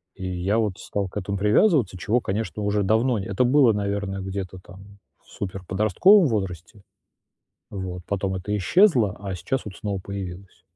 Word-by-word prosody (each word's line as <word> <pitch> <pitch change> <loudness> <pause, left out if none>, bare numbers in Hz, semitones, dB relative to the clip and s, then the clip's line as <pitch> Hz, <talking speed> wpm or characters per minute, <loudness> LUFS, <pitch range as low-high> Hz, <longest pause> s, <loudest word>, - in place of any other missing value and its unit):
И 95 - -7
я 90 +4 -1
вот 105 -5 0
стал 100 -1 -3
к 95 - -9
этому 100 0 -3
привязываться, 105 - +3
чего, 110 +7 +1
конечно, 105 +1 -3
уже 105 0 +1
давно 110 +4 +2
не 95 - -5
Это 100 +5 +1
было, 125 -2 +5
наверное, 100 -1 -2
где-то 95 -1 -5
там 100 +2 -15 0.2
в - - -26
суперподростковом 105 - +3
возрасте. 95 - -4 0.9
Вот, 95 -3 -6
потом 95 -1 -1
это 100 +3 -3
исчезло, 120 - +3
а 100 -2 -5
сейчас 130 +8 -3
вот 100 -4 -8
снова 100 0 -4
появилось. 95 -2 -8
100 Hz, 160 wpm, -24 LUFS, 95-110 Hz, 0.9 s, было